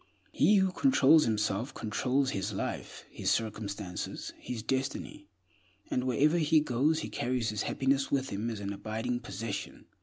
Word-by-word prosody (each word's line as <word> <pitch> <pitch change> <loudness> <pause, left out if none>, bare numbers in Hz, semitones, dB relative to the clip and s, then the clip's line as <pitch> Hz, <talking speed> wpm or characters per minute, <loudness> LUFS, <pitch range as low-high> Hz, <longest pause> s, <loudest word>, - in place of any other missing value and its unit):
He 210 - +4
who 190 -1 +3
controls 165 - +5
himself 110 +2 -1
controls 130 +5 0
his 100 0 -2
life, 95 - -5
his - - -2
circumstances, 105 -4 -3
his 115 -3 -5
destiny, 135 - -3 0.6
and 125 - 0
wherever 145 +7 +3
he 155 0 +4
goes 150 +3 +1
he - - -4
carries 120 -2 -1
his 105 -2 -2
happiness 135 +1 +1
with 135 -1 +1
him 105 +4 -2
as 110 -3 -5
an 100 0 -3
abiding 110 +4 -3
possession. 110 -4 -5
125 Hz, 150 wpm, -30 LUFS, 110-140 Hz, 0.6 s, controls